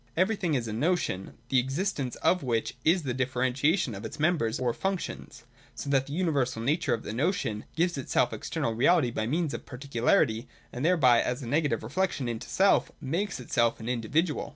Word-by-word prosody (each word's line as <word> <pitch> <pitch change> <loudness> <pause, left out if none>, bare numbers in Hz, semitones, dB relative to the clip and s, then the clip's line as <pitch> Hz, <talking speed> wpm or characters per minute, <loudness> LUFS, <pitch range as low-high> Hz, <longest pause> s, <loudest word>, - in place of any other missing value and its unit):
Everything 185 -4 +1
is 120 -3 -1
a 110 - -4
notion, 125 - -1
the 130 - +4
existence 135 0 -2
of 180 - +3
which 115 -3 -1
is 170 +1 +3
the 130 -3 -2
differentiation 130 - +1
of 100 +2 -7
its 110 - -7
members 150 -8 +1
or 125 -2 0
functions, 190 +4 -4 0.3
so 140 - -4
that 135 -1 +2
the 140 - -6
universal 145 -9 0
nature 135 +1 +1
of 115 - -10
the 105 - -5
Notion 135 - -1
gives 170 -2 +1
itself 130 - +1
external 115 - -2
reality 130 +2 +3
by 110 -1 -2
means 155 +3 0
of - - -6
particularity, 125 -3 +1 0.3
and 125 - -4
thereby, 145 -9 +5
and - - 0
as 125 +3 -2
a - - -6
negative 145 -4 +1
reflection 140 +2 -1
into 115 -2 -5
self, 195 +1 +3
makes 170 +8 -2
itself 120 -1 +1
an 110 - -7
individual. 130 +7 0
135 Hz, 185 wpm, -28 LUFS, 120-165 Hz, 0.3 s, thereby